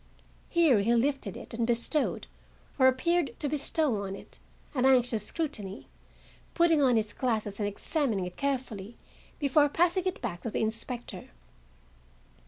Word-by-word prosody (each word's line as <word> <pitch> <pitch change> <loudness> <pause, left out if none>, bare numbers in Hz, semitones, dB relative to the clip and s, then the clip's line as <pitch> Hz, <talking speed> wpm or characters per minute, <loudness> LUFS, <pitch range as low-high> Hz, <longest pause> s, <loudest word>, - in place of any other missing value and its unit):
Here 325 - +4
he 230 +4 +2
lifted 255 -4 0
it - - -10
and 230 0 -1
bestowed, 240 +5 +1 0.5
or 260 - +7
appeared 280 +2 +1
to 295 - -1
bestow 285 -5 0
on 195 -1 -4
it, - - -14 0.3
an 255 -4 0
anxious 245 -5 +3
scrutiny, 215 - -4 0.7
putting 335 -3 +4
on 255 -3 +4
his 215 -2 0
glasses 220 -5 -1
and 205 - 0
examining 215 - -1
it 180 - -7
carefully 245 -6 -3 0.4
before 290 +1 +3
passing 350 +4 +2
it 370 - -2
back 185 -8 -4
to 230 - -3
the - - -2
inspector. 225 +2 -4
250 Hz, 145 wpm, -29 LUFS, 215-290 Hz, 0.7 s, or